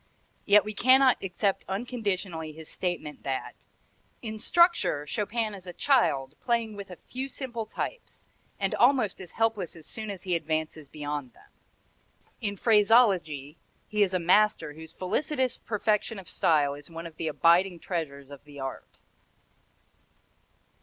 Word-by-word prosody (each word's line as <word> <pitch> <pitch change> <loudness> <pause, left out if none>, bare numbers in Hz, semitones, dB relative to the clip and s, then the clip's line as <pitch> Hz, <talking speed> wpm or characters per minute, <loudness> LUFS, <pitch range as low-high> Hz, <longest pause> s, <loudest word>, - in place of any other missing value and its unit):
Yet 205 +1 +6
we 215 - -4
cannot 260 +3 +5
accept 195 +1 0
unconditionally 195 -7 -3
his 160 0 -11
statement 175 -5 -4
that 135 -1 -3 0.7
"in 220 -1 -5
structure 340 - +3
Chopin 215 +6 -2
is 190 -2 -10
a 180 - -6
child 145 - +2
playing 230 -3 0
with 200 -1 -8
a 180 - -8
few 260 +9 -6
simple 240 -5 -5
types, - - -6 0.4
and - - 0
almost 245 -7 +3
helpless 225 -7 0
as 160 -2 -11
soon 215 -1 -4
as 195 -3 -5
he 185 -2 -1
advances 155 -2 -3
beyond 145 -4 -5
them; - - -22 0.9
in 205 -2 -2
phraseology 200 - +3 0.3
he 210 0 -1
is 190 -2 +3
a - - +4
master 185 -2 +3
whose 160 +1 -11
felicitous 260 - -1
perfection 215 0 0
of 190 -3 -9
style 145 -3 +2
is 145 0 -11
one 165 0 -7
of 165 -2 -10
the 160 - -3
abiding 170 +4 +3
treasures 140 -7 -4
of 140 -1 -11
the 145 -1 -12
art." 135 0 -7
190 Hz, 145 wpm, -28 LUFS, 155-220 Hz, 0.9 s, Yet